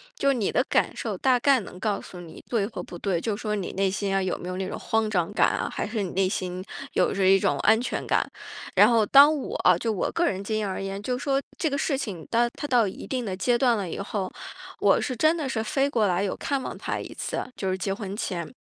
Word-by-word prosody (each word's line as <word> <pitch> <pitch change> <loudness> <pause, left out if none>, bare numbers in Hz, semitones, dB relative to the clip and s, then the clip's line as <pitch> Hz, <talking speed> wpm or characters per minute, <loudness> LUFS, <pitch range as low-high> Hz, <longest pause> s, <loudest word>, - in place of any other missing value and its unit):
就 280 - -1
是 - - +4
你 230 -6 0
的 250 - +2
感 - - +1
受 - - -3
大 260 -2 +3
概 275 +1 +4
能 185 -3 -10
告 205 0 0
诉 180 - -10
你 165 -2 -12
对 225 -5 +1
或 220 - -6
不 175 - -9
对， 180 -1 -1
就 220 +1 -1
说 210 0 -2
你 195 -3 -3
内 195 0 +1
心 200 0 -2
呀， 195 0 +1
有 185 - -1
没 175 - -8
有 185 - -4
那 190 0 -2
种 - - -5
慌 225 -1 0
张 180 -3 0
感 - - +4
啊， - - -2
还 - - -3
是 215 0 -2
你 185 - -4
内 190 0 +2
心 185 -2 -3 0.3
有 - - +2
着 195 -1 +2
一 195 +1 +7
种 - - +1
安 220 +1 +4
全 245 - -3
感。 - - +2 0.5
然 - - +8
后 230 -3 +4
当 285 +7 +7
我 275 - -5
啊 180 -1 +4
就 225 +5 -1
我 205 - -1
个 345 - +1
人 195 - -1
经 215 +2 -2
验 215 -1 -1
而 190 - -3
言， 195 +1 -4
就 250 +3 -1
说 275 -1 +1 0.2
这 320 - +1
个 280 - -1
事 280 0 0
情 190 - -5
它 240 +1 +3
它 290 - -4
到 245 -5 +3
一 190 - -7
定 255 -2 -2
的 190 -3 -3
阶 240 +6 +2
段 240 -2 +3
了 195 -3 -3
以 - - -5
后， 200 -1 -3 0.5
我 - - +4
是 255 - -2
真 310 +7 +3
的 300 -4 -2
是 220 -4 -1
飞 270 +5 +1
过 225 -7 +2
来 180 +1 +1
有 195 - -1
看 280 -2 -2
望 - - -5
他 - - -3
一 - - -7
次， - - -3
就 190 - -2
是 185 - -1
结 195 +1 -2
婚 200 -1 -5
前， 175 -6 -3
210 Hz, 295 characters per minute, -26 LUFS, 190-245 Hz, 0.5 s, 然